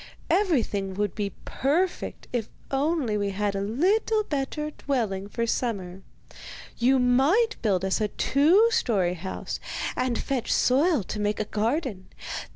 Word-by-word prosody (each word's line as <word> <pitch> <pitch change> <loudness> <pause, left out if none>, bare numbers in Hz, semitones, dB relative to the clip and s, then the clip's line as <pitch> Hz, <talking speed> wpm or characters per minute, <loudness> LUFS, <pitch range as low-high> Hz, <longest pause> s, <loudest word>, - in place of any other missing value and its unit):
'Everything 225 - +1
would 205 -1 0
now - - -29
be 200 -3 -2
perfect 335 +8 -1
if 230 -3 -1 0.2
only 275 -4 +1
we 200 0 0
had 200 +1 -1
a 195 - -1
little 390 - +1
better 300 -1 -3
dwelling 215 -10 -2
for 230 +2 -1
summer. 195 -6 -2 0.8
You 255 +3 +4
might 275 - +3
build 190 -4 +1
us 190 +3 0
a 210 - +2
two 335 - +4
storey 205 - +1
house, 185 +2 -5 0.4
and 250 -2 0
fetch 265 -4 -2
soil 280 - +3
to 210 - -5
make 210 0 0
a 215 - 0
garden. 220 - -2
240 Hz, 145 wpm, -26 LUFS, 205-300 Hz, 0.8 s, You